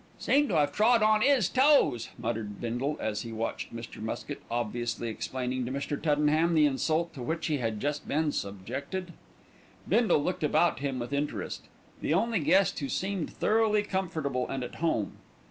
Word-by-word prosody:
"Seem 290 +1 +3
to 180 - +1
'ave 145 -1 +3
trod 225 +1 +4
on 215 0 +4
'is 260 -6 +4
toes," 265 - +3
muttered 110 -3 -4
Bindle 125 +5 -2
as 105 -1 -2
he 115 - -6
watched 115 +1 -3
Mr. 115 -2 -8
Muskett 110 +6 -5
obviously 120 0 -2
explaining 125 +3 -3
to - - -4
Mr. 140 +2 -2
Tuddenham 155 +2 +2
the 155 -1 +6
insult 155 +4 0
to 135 - -8
which 160 +7 -2
he 150 -3 0
had 110 -3 -2
just 145 +3 -2
been 150 +1 +1
subjected. 135 - -5 0.7
Bindle 215 -7 +3
looked 180 -1 -2
about 155 +3 +3
him 135 -2 -2
with 120 +2 -4
interest, 145 +1 -3 0.4
the 155 - +1
only 225 +2 +1
guest 180 +5 +3
who 140 -3 -3
seemed 190 -3 -2
thoroughly 215 -1 +2
comfortable 160 -10 -2
and 135 -1 -3
at 125 - -6
home. 115 -12 0
150 Hz, 170 wpm, -29 LUFS, 120-185 Hz, 0.7 s, the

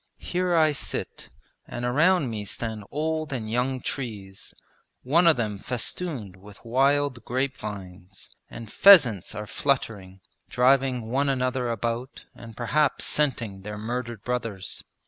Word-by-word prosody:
Here 180 -1 -1
I 155 -2 +5
sit, 145 - -5 0.4
and 120 0 -4
around 150 +2 +3
me 105 -2 -4
stand 110 +1 -4
old 155 +1 -2
and 120 -5 -3
young 125 +2 0
trees, 105 -9 -6 0.5
one 165 +7 +4
of 160 - +6
them 105 -4 -2
festooned 120 - -3
with 100 +3 -15
wild 135 0 +2
grape 130 +3 -1
vines, 95 -3 -9 0.2
and 115 -2 -9
pheasants 135 - +6
are 105 +2 -4
fluttering, 105 -7 -2 0.3
driving 125 -2 +2
one 140 +2 +2
another 130 -2 0
about 115 +3 -3
and 115 -1 -12
perhaps 145 +5 +1
scenting 120 -9 -1
their 105 +1 -6
murdered 115 0 -4
brothers.' 115 -7 -3
125 Hz, 130 wpm, -26 LUFS, 105-140 Hz, 0.5 s, of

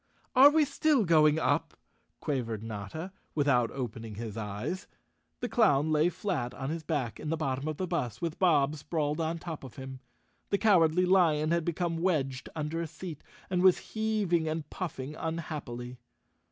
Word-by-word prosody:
"Are 270 +3 +10
we 305 0 +4
still 285 -4 +2
going 155 -2 +5
up?" - - 0 0.4
quavered 115 -6 -2
Notta, 115 - -6 0.2
without 135 -6 +3
opening 115 -4 -5
his 110 -1 -6
eyes. 105 - -4 0.5
The 245 - -1
clown 160 - +3
lay 155 +2 +4
flat 165 -9 -3
on 135 +2 -3
his 165 0 -3
back 145 -7 -2
in 155 - -4
the 165 - 0
bottom 135 -2 -2
of 155 -1 -3
the 185 - -1
bus 125 - -2
with 165 -2 -3
Bob 150 -5 +3
sprawled 150 0 -2
on 165 +1 -1
top 165 -3 -7
of 130 - -10
him. 130 -1 -8 0.5
The 200 - +2
Cowardly 180 -4 +4
Lion 165 -4 +3
had 170 -1 +2
become 170 0 -1
wedged 135 -8 0
under 155 +1 -2
a 165 - -3
seat 160 -1 -8 0.2
and 180 -1 0
was 185 -1 +3
heaving 210 -7 +1
and 155 -1 -3
puffing 150 -5 -5
unhappily. 140 -7 -5
155 Hz, 165 wpm, -30 LUFS, 135-175 Hz, 0.5 s, Are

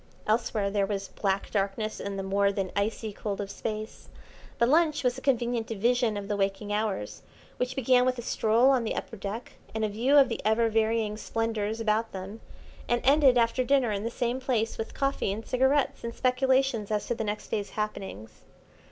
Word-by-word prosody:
Elsewhere 215 -2 0
there 200 -1 +1
was 195 -1 -3
black 195 -1 -2
darkness 205 +2 -1
and 200 0 -4
the 195 - -3
more 200 +1 +2
than 195 -2 -3
icy 215 +1 -1
cold 200 -1 -4
of 200 -1 -4
Space; 215 0 -6 0.5
but 235 - +3
lunch 310 +2 +3
was 250 -1 +2
a 260 - -8
convenient 240 -4 0
division 230 0 +1
of 200 -1 -5
the 205 - -1
waking 200 +1 -1
hours, 210 - -2 0.4
which 250 +1 -2
began 255 -1 +4
with 255 0 +1
a 240 - -5
stroll 230 +4 +3
on 255 -3 +2
the 220 - -2
upper - - -5
deck 205 +3 -6 0.2
and 220 0 0
a - - -1
view 245 +8 +3
of 275 -2 +7
the 230 - -4
ever 220 +2 +3
varying 220 -1 +1
splendours 225 -1 -2
about 225 0 0
them, 195 +4 -7 0.5
and 240 0 +2
ended 275 -2 +6
after 235 +2 +2
dinner 260 -3 +2
in 200 -1 -2
the 230 - -1
same 240 +1 -2
place 240 -4 0
with 225 - -6
coffee 275 -7 0
and 215 +3 -5
cigarettes 265 +2 +1
and 235 0 -5
speculations 260 -3 +1
as 210 -1 -1
to - - -1
the 225 - -3
next 210 0 -4
day's 205 -2 -2
happenings. 195 - -5
225 Hz, 195 wpm, -28 LUFS, 205-250 Hz, 0.5 s, of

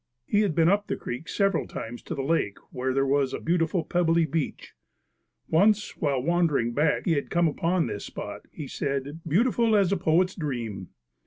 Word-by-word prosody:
He 205 - +2
had 195 -7 0
been 165 -1 +4
up 205 +3 +2
the - - -1
creek 125 +7 -6
several 195 -4 +1
times 120 +2 -7
to - - -6
the 135 - -3
lake 135 -9 0
where 130 0 -2
there 135 +1 +1
was 135 -1 +1
a - - -5
beautiful 165 0 0
pebbly 170 -1 +2
beach. 155 -1 -3 0.7
Once, 205 +5 +3
while 140 -4 0
wandering 160 -7 +2
back, 150 +4 +1
he 175 - +2
had 145 -3 0
come 175 -1 +3
upon 165 +3 0
this 105 -3 -5
spot, - - -7
he 150 - -7
said, 140 +3 -3
"Beautiful 225 - +3
as 200 -3 +3
a 200 - +2
poet's 180 +2 +2
dream." 115 - -4
160 Hz, 185 wpm, -26 LUFS, 135-180 Hz, 0.7 s, been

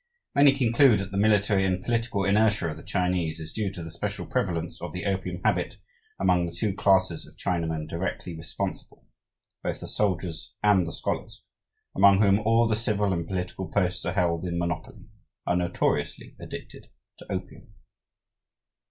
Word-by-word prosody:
Many 140 -1 +6
conclude 120 -3 +4
that 95 0 -5
the 100 - -3
military 105 -2 +3
and 95 -1 0
political 115 -4 0
inertia 105 -3 +3
of - - -8
the - - -10
Chinese 90 -3 -1
is 80 0 -7
due 105 -3 -1
to 90 -3 -7
the 80 - -7
special 85 - -4
prevalence 85 -3 -2
of 90 -1 -5
the 90 +2 -5
opium 95 -2 -2
habit - - +1 0.4
among 90 -2 +3
the - - -5
two 95 +4 -1
classes 95 -4 +2
of - - -18
Chinamen 80 -3 -2
directly 85 0 -4
responsible: 80 0 -5 0.6
both - - -3
the - - -7
soldiers 95 0 -2
and 100 -4 +4
the - - -4
scholars, - - -4 0.5
among 100 0 +6
whom 100 -1 +5
all 115 +2 +3
the 110 - +2
civil 105 -3 0
and 85 -2 -2
political 95 0 -3
posts 90 -3 0
are 90 - -1
held 85 -3 +1
in 85 -1 -2
monopoly, 90 +5 -4 0.4
are 90 - +1
notoriously 90 -1 -1
addicted - - -9 0.3
to - - -10
opium." - - -6
95 Hz, 165 wpm, -27 LUFS, 85-105 Hz, 0.6 s, Many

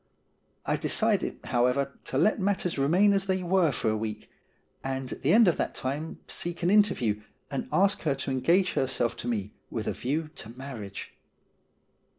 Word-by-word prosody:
I - - +1
decided, - - +1
however, 125 +3 +1
to 130 - -2
let 215 +9 +3
matters 190 -5 0
remain 180 +9 +4
as 195 -1 0
they 190 -1 0
were 175 -3 +3
for 115 -3 0
a - - 0
week, 110 0 -5 0.5
and 135 -1 -3
at - - -7
the 140 - +2
end 225 0 +7
of 175 - +3
that - - -2
time 145 +5 -4
seek 175 0 -3
an 175 - +3
interview, 185 - +3 0.3
and 135 - -3
ask 200 +2 +3
her 145 -4 +1
to 135 0 -4
engage 170 +8 +2
herself 130 -3 0
to - - -6
me 105 -3 -2 0.2
with - - -4
a - - 0
view 155 +5 -2
to 115 +3 -9
marriage. 120 -8 -7
140 Hz, 175 wpm, -28 LUFS, 125-185 Hz, 0.5 s, end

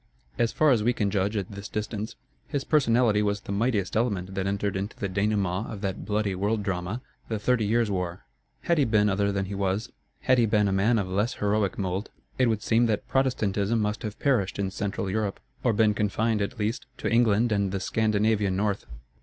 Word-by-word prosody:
As 115 -1 +2
far 155 -2 +3
as 120 -4 +3
we 120 +3 +2
can 105 -4 0
judge 100 +2 0
at 100 -1 -3
this 100 +1 -7
distance, 105 0 -4 0.3
his 140 -2 -2
personality 120 -7 +3
was 100 -1 0
the - - -7
mightiest 100 -3 0
element 100 -5 0
that 95 0 -2
entered 100 0 -1
into 100 +2 -4
the 100 - -2
dénouement 100 0 0
of 105 -3 -7
that 95 -1 -3
bloody 105 -1 0
world 105 +3 0
drama, 95 +5 -3 0.3
the 110 - -1
Thirty 110 0 +1
Years' 115 0 +2
War. 90 -2 -3 0.4
Had 170 -2 +1
he 140 - +4
been 105 -3 +3
other 100 +1 +1
than 100 -1 -1
he 100 - -6
was, 100 +1 -1 0.3
had 130 -1 +3
he 115 - +4
been 105 -1 +3
a - - +1
man 105 +5 +3
of 100 -3 -1
less 105 +7 0
heroic 105 -1 0
mould, 95 +1 -2 0.3
it 130 - +4
would 110 -2 0
seem 115 +1 +3
that 105 -2 -1
Protestantism 115 -5 +1
must 105 0 -1
have 105 -1 -5
perished 120 -9 +1
in 100 -1 -1
Central 100 0 -3
Europe, 105 0 -1 0.2
or 120 - +3
been 110 -1 +3
confined, 105 +1 0
at 100 - -3
least, 110 +5 -2
to - - -3
England 115 -1 +3
and 100 -2 +1
the 100 - -2
Scandinavian 105 -1 +1
North. 100 0 -1
105 Hz, 210 wpm, -27 LUFS, 100-115 Hz, 0.4 s, he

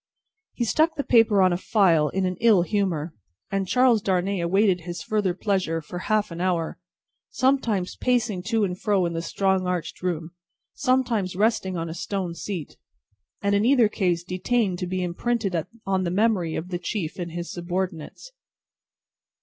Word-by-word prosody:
He 240 - -1
stuck 315 +7 +2
the 285 - -2
paper 225 -6 +4
on 185 -1 +4
a - - 0
file, 175 -7 +3
in 190 0 -1
an 185 0 -1
ill 220 -6 +5
humour, 175 -5 -1 0.4
and 195 -1 -1
Charles 250 0 +4
Darnay 190 0 0
awaited 185 +1 +2
his 175 +1 -6
further 205 -5 0
pleasure 185 -5 0
for 175 +3 -7
half 210 0 0
an 170 +1 -5
hour: 175 -3 -1 0.5
sometimes, 240 -9 0
pacing 240 -7 0
to 225 -1 +1
and 180 -2 -2
fro 200 -4 +2
in 170 - -2
the 165 - -2
strong 190 +2 0
arched 180 -2 -3
room: 170 -2 -2 0.4
sometimes, 245 -9 0
resting 200 -3 +1
on 165 0 -3
a 160 - -5
stone 180 0 -3
seat: 170 -1 -6 0.7
in 200 0 +2
either 245 -2 +5
case 180 -5 0
detained 185 +1 0
to 180 - -3
be 185 0 -2
imprinted 195 +2 -1 0.3
on 190 -1 +1
the 175 - -1
memory 190 -4 +1
of 175 +3 -4
the 175 -1 -3
chief 185 -4 -4
and 170 -2 -5
his 175 0 -5
subordinates. 175 - -4
185 Hz, 165 wpm, -25 LUFS, 175-215 Hz, 0.7 s, ill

